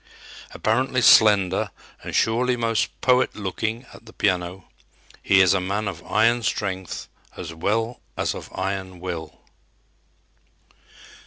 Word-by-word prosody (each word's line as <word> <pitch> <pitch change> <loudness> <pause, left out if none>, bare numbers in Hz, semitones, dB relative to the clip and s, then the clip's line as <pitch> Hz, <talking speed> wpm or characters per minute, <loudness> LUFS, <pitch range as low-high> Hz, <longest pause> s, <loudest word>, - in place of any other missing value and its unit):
Apparently 130 +4 0
slender 100 -5 +5 0.3
and - - -6
surely 125 +3 +2
most 115 -2 0
poet 125 0 +3
looking 110 +4 -3
at - - -14
the - - -13
piano, 90 +1 -1 0.5
he 95 -1 +4
is 95 0 +5
a 95 - +1
man 100 +3 -2
of 90 -3 -6
iron 115 +2 +3
strength 95 -5 -3 0.3
as 80 -2 -6
well 110 +8 -1 0.2
as - - 0
of - - -9
iron 95 -1 -4
will. 85 -3 -6
100 Hz, 125 wpm, -23 LUFS, 95-115 Hz, 0.5 s, slender